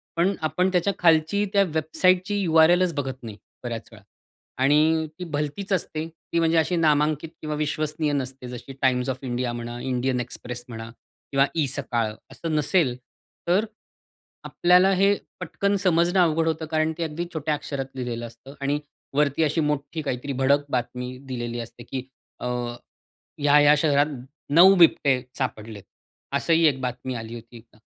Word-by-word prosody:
पण 180 +4 +2
आपण 180 +4 +1
त्याच्या 185 +2 +1
खालची 165 +4 +3
त्या 200 -1 +5
वेबसाईटची 185 +5 +2
यू-आर-एलच 170 +1 +4
बघत 130 -3 -4
नाही 110 -3 -8 0.3
बऱ्याच 115 -2 -5
वेळा 110 -2 -15 0.6
आणि 155 +3 +3
ती 180 - -4
भलतीच 150 +5 -4
असते, 160 -3 -2
ती 165 +1 -4
म्हणजे 165 0 +2
अशी 165 +3 +2
नामांकित 155 -1 +2
किंवा 155 -1 -3
विश्वसनीय 150 0 -1
नसते 130 -2 -4
जशी 125 +2 -8
Times 125 0 +2
of 130 +2 -16
India 120 0 -1
म्हणा, 120 0 -6
Indian 130 0 -1
Express 125 0 -7
म्हणा 115 -1 -7 0.4
किंवा 135 0 +4
eSakal 125 -7 -1 0.2
असं 165 -2 -4
नसेल, 150 -4 +2 0.5
तर 185 +5 +3 0.8
आपल्याला 180 +2 +4
हे 195 +2 +4 0.3
पटकन 200 0 -1
समजणं 175 0 +3
अवघड 165 -2 +3
होतं 160 0 -1
कारण 155 0 +1
ते 170 - -2
अगदी 165 +2 -3
छोट्या 155 -1 -1
अक्षरात 140 -2 -4
लिहिलेलं 120 -2 -4
असतं 115 +4 -14
आणि 140 +1 0 0.4
वरती 150 +1 +2
अशी 155 +2 +1
मोठी 150 +1 -2
काहीतरी 140 -1 -3
भडक 140 +2 +2
बातमी 125 0 -3
दिलेली 120 -2 -4
असते, 120 +1 -9
की 130 0 -5 0.4
अ, - - -4 1.0
"या-या 145 0 +6
शहरात 145 -1 +3 0.5
9 185 +5 +8
बिबटे 145 -7 +4 0.2
सापडलेत." 110 -6 -4 0.5
असंही 165 0 +3
एक 135 -3 0
बातमी 125 0 -4
आली 115 0 -6
होती 120 +1 -11
एकदा. 115 -1 -19
150 Hz, 150 wpm, -24 LUFS, 125-165 Hz, 1.0 s, 9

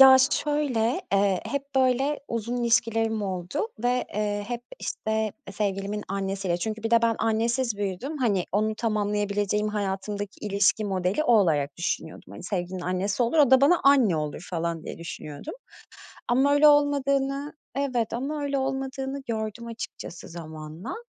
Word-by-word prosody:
Ya, 265 -1 +11
şöyle, 290 -2 +1
eee, 195 -1 +3
hep 280 -1 -2
böyle 265 +3 +2
uzun 230 +1 -2
ilişkilerim 225 -1 +2
oldu 185 - -2 0.2
ve, 250 +1 +2
eee, 205 -1 -1
hep, 240 -1 -3 0.2
işte, 220 -1 -2 0.2
sevgilimin 200 0 -2
annesiyle 195 -2 -1
çünkü 215 +4 -4
bir 225 - -2
de 230 0 +5
ben, 230 -1 +2
annesiz 230 +1 +1
büyüdüm, 205 - -3
hani, 205 -8 +1
onu 215 +2 +1
tamamlayabileceğim, 210 -1 0
hayatımdaki 205 0 -3
ilişki 205 +1 +2
modeli, 190 +7 0
o 245 - +4
olarak 150 -7 +1
düşünüyordum. 170 -2 -4
Hani, - - -9
sevgilinin 180 -1 -3
annesi 190 +5 0
olur, 240 +7 +1
o 285 -4 +6
da 265 0 +7
bana 320 +5 +5
anne 260 - +5
olur 150 +3 -4
falan 170 -1 -2
diye - - -7
düşünüyordum 155 - -7 0.7
ama 265 +4 +3
öyle 290 +1 +6
olmadığını 280 0 +2 0.3
Evet 245 -6 0
ama 285 +5 -2
öyle 280 -1 0
olmadığını 270 0 -3
gördüm 220 0 -3
açıkçası 225 -6 -7
zamanla. 160 - -7
220 Hz, 145 wpm, -26 LUFS, 195-265 Hz, 0.7 s, Ya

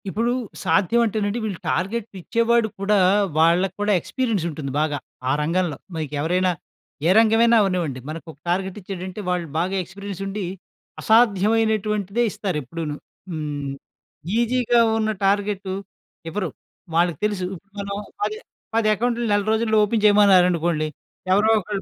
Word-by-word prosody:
ఇప్పుడు 230 +5 0 0.3
సాధ్యం 205 +5 +3
అంటేనండి 215 0 -1
వీళ్ళు 205 -5 -3
టార్గెట్ 210 +5 -1
ఇచ్చేవాడు 230 +3 +2
కూడా, 205 +1 +2 0.4
వాళ్ళకి 175 +3 +3
కూడా 205 0 +2
ఎక్స్‌పీరియన్స్ 225 -2 -1
ఉంటుంది 145 -3 -5
బాగా, 150 -1 0 0.3
ఆ - - +3
రంగంలో. 170 -2 0 0.2
మీకు 155 -2 -4
ఎవరైనా 180 +4 +2 0.6
ఏ - - +4
రంగమైనా 225 +1 +5
అవ్వనివ్వండి. 175 -9 -1
మనకు 160 +2 -7
ఒక 155 - -20
టార్గెట్ 190 +2 -1
ఇచ్చాడంటే, 185 +1 -6
వాళ్ళు 180 -2 -1
బాగా 185 +3 -1
ఎక్స్‌పీరియన్స్ 195 +1 -8
ఉండి, 195 0 -3 0.6
అసాధ్యమైనటువంటిదే 215 -1 +2
ఇస్తారు 185 -5 -3
ఎప్పుడూనూ. 150 +3 -5 0.4
హ్మ్. 145 -3 -4 0.7
ఈసీగా 240 0 +2 0.2
ఉన్న 220 -1 +1
టార్గెటు 200 -1 0 0.6
ఇవ్వరు. 185 +1 -2 0.5
వాళ్ళకి 170 -3 +2
తెలుసు. 205 -3 -1
ఇప్పుడు 195 +3 -26
మనం 200 0 -4 0.3
పది 430 - -1 0.4
పది 225 -1 +2
అకౌంట్లు 240 +2 -1
నెల 205 0 +3
రోజుల్లో 220 0 +2
ఓపెన్ 215 0 -1
చేయమన్నారనుకోండి, 180 -6 +4 0.5
ఎవరో 210 +3 +4
ఒకళ్ళు 200 0 -4
195 Hz, 130 wpm, -22 LUFS, 175-220 Hz, 0.7 s, రంగమైనా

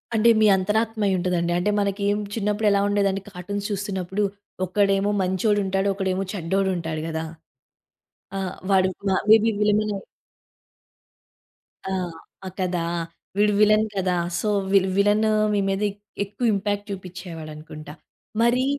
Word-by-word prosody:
అంటే 220 +2 +5
మీ 215 - +5
అంతరాత్మ 220 +3 0
అయ్యి 190 - +2
ఉంటదండి. 175 -1 0
అంటే 180 +4 +1
మనకి 200 0 -1 0.3
చిన్నప్పుడు 210 0 0
ఎలా 200 - +3
ఉండేదండి 200 -1 +1
కార్టూన్స్ 200 +2 -5
చూస్తున్నప్పుడు 195 -1 -2 0.4
ఒకడేమో 195 +2 +2
మంచోడు 190 +3 +1
ఉంటాడు, 195 +1 0
ఒకడేమో 190 -1 -1
చెడ్డోడు 190 +1 0
ఉంటాడు 160 -2 -3
గదా! 160 0 -3 1.1
ఆ! - - -1 0.3
వాడు 190 -1 +4 0.2
మా 190 - +3
మే 220 - +10
బీ 225 - +3
విల్‌వినై 210 0 +2 1.9
ఆ! - - -3 0.5
ఆ! - - -4
కదా! 180 -2 0 0.6
వీడు 210 0 +4
విలన్ 215 +1 +5
కదా! 185 -2 +1 0.2
సో, 215 - -2 0.2
వి 195 - +7 0.2
విలను 210 +2 +3 0.2
మీ 205 - +2
మీద 195 +1 -1 0.4
ఎక్కువ 205 +4 -4
ఇంపాక్ట్ 205 +1 -2
చూపించేవాడనుకుంటా. 165 -5 -8 0.5
మరీ 245 +2 +3
195 Hz, 130 wpm, -24 LUFS, 185-210 Hz, 1.9 s, మే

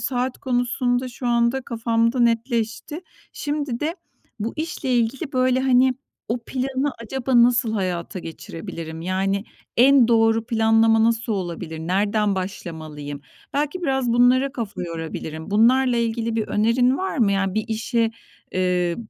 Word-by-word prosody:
saat 255 -1 -2
konusunda 245 0 0
şu 245 +1 -6
anda 235 +2 +2
kafamda 230 +1 0
netleşti. 230 +4 0 0.3
Şimdi 290 -5 -3
de 320 +4 -2 0.4
bu 225 +3 -2
işle 310 -5 -2
ilgili, 245 +6 -1
böyle, 255 0 +2
hani, 260 0 +4 0.3
"O 230 +3 0
planı 265 +2 -1
acaba 245 +1 +2
nasıl 235 -2 +3
hayata 185 -2 -2
geçirebilirim? 165 -1 -7
Yani, 195 +3 -1 0.3
en 255 0 +6
doğru 225 -1 +3
planlama 225 -1 +4
nasıl 230 0 +1
olabilir? 170 -4 -4
Nereden 200 +5 +1
başlamalıyım?" 155 -6 -6 0.3
Belki 300 +5 -1
biraz 265 -6 +1
bunlara 255 +3 +4
kafa 230 -9 -5
yorabilirim. 160 -1 -6
Bunlarla 245 +4 +4
ilgili 230 0 -1
bir 220 - -1
önerin 245 +5 +2
var 380 -5 -2
mı? 210 -5 +3
Yani, 195 -1 0
bir 215 0 0
işe, 225 +1 0 0.4
eee, 180 -2 +1
230 Hz, 130 wpm, -22 LUFS, 200-255 Hz, 0.4 s, en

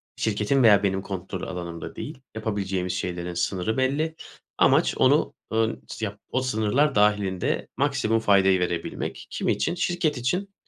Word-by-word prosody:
şirketin 110 +5 +1
veya 105 -3 +6
benim 95 -1 +1
kontrol 95 -1 -5
alanımda 85 -3 -6
değil. 145 -3 -7 0.2
Yapabileceğimiz 95 -4 -2
şeylerin 90 -2 -3
sınırı 90 +5 -1
belli. 145 +5 0 0.4
Amaç, - - +4
onu, - - +3 0.2
eee, 110 -8 +2
s - - -4
yap - - -6
o 130 - 0
sınırlar 130 +4 +1
dâhilinde 105 -3 +1
maksimum 115 +1 +1
faydayı 95 -3 +4
verebilmek. 85 -1 -3
Kim - - -3
için? - - 0
Şirket 175 -5 0
için, 180 +11 -2
105 Hz, 140 wpm, -25 LUFS, 95-130 Hz, 0.4 s, veya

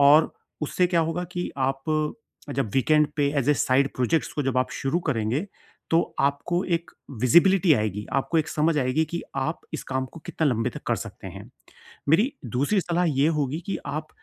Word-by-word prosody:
और 145 +3 +6 0.3
उससे 180 +4 +2
क्या 175 -1 +2
होगा 165 +2 -1
कि 175 0 -3
आप 135 0 0 0.7
जब 130 -5 -1
वीकेंड 150 +4 +4
पे 145 -2 +2
एज़ 140 +1 0
ए - - +4
साइड 135 0 +2
प्रोजेक्ट्स 130 +2 +1
को 145 - -1
जब 135 -1 -1
आप 130 - 0
शुरू 135 +6 +1
करेंगे 125 - 0 0.4
तो 165 - +5 0.2
आपको 140 +6 +1
एक 170 -1 -1 0.3
विज़िबिलिटी 175 +8 +5
आएगी, 105 -2 -2
आपको 135 +5 +1
एक 160 0 0
समझ 155 +1 +1
आएगी 130 +4 +1
कि 170 +1 -4
आप 150 +5 -1
इस - - -3
काम 130 0 -2
को 165 - -11
कितना 160 - 0
लंबे 120 0 0
तक - - -9
कर - - +1
सकते - - -8
हैं। - - -11 0.6
मेरी 220 - +4 0.2
दूसरी 145 +10 +2
सलाह 175 0 0
ये 140 -1 +2
होगी 145 +3 -1
कि 195 - -2
आप 155 +2 -4
150 Hz, 190 wpm, -25 LUFS, 130-165 Hz, 0.7 s, और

